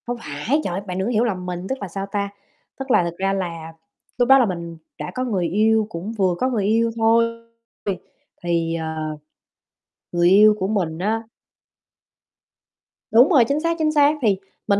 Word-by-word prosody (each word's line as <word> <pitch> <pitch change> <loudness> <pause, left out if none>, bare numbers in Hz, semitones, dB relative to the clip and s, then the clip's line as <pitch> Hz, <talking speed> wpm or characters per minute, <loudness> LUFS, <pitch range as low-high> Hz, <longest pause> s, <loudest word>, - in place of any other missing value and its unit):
Không 245 0 -2
phải, 150 - -1
trời - - -3
ơi, 190 - -3
bạn 180 0 -4
đừng 190 - -1
có - - -1
hiểu 225 0 +2
lầm 190 -6 -2
mình, 180 0 -5
tức 265 - -2
là, 200 - -4
sao 195 +2 -5
ta? 200 -1 -1 0.5
Tức 270 -1 -4
là 180 - +5
thực 170 0 -5
ra 195 +1 0
là 165 -4 -4 0.4
lúc 245 -1 +2
đó 270 - +9
là 250 - +4
mình 170 -4 -5 0.2
đã - - -6
có 255 - -1
người 195 -9 -1
yêu, 220 +4 +2
cũng 175 +4 -6
vừa 185 -3 +2
có 255 - +1
người 220 -6 -1
yêu 230 +2 +2
thôi. 230 +1 +4 0.6
Vì 195 -3 -1 0.5
thì, 165 -1 0
à, 160 -1 -4 1.2
người 175 0 +3
yêu 210 +3 +7
của 190 - -1
mình 175 -7 -1
á 220 +5 -1 1.9
Đúng 240 +5 +6
rồi, 270 -9 +5
chính 280 +5 0
xác, 335 +1 -1
chính 310 -1 +2
xác, 295 0 +4
thì 210 -5 +2 0.3
mình 200 0 +3
200 Hz, 200 wpm, -21 LUFS, 175-230 Hz, 1.9 s, đó